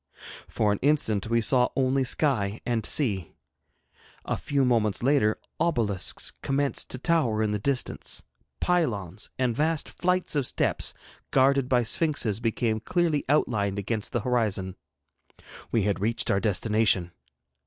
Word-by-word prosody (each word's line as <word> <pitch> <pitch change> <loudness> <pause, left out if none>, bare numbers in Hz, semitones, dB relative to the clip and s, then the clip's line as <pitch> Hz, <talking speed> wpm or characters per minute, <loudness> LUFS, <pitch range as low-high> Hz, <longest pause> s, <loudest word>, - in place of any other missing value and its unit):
For 105 - +1
an 105 - -1
instant 110 -8 +1
we 115 0 +2
saw 125 +2 +3
only 135 0 +2
sky 120 -7 +1
and 115 -2 0
sea. 100 - 0 0.9
A - - -1
few 140 -2 0
moments 115 -4 +1
later 130 -6 +3 0.2
obelisks 115 - 0
commenced 140 +1 -1
to - - -4
tower 125 -8 +1
in 105 - 0
the 105 - -1
distance; 135 +4 -2 0.4
pylons 105 - -1
and 125 -3 0
vast 155 +3 0
flights 180 -2 -1
of 140 -4 +1
steps - - 0 0.3
guarded 135 0 +3
by 125 -2 +3
sphinxes 115 - -1
became 115 -1 0
clearly 165 +3 0
outlined 105 -9 +1
against 105 +2 -3
the 120 - -1
horizon. 105 -6 -1 1.0
We 115 - +2
had 100 0 0
reached 110 +3 0
our 100 - +2
destination. 105 -3 +2
120 Hz, 135 wpm, -26 LUFS, 105-140 Hz, 1.0 s, saw